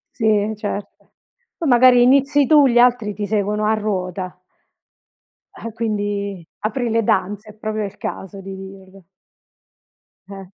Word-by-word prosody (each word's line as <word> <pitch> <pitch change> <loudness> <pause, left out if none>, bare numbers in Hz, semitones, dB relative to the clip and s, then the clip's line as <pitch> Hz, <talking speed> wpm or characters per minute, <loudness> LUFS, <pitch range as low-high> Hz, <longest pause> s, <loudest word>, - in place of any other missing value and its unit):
Sì, 215 -2 +1
certo. 205 -1 -7 0.5
Poi 330 - -3
magari 245 0 +6
inizi 280 +3 +4
tu, 295 -3 +6
gli 240 -2 +1
altri 240 -4 +3
ti 205 +1 -4
seguono 210 0 -1
a 215 - +2
ruota. 185 -4 -3 1.2
Eh 230 - -7
quindi 205 -4 -3
apri 230 +4 -2
le 225 0 +1
danze, 205 +2 -1
è - - -19
proprio 215 0 -4
il 200 0 -9
caso 195 +1 -7
di 195 0 -8
dirlo. 190 -1 -13 1.2
Eh. 195 -1 -9
210 Hz, 135 wpm, -20 LUFS, 195-230 Hz, 1.2 s, magari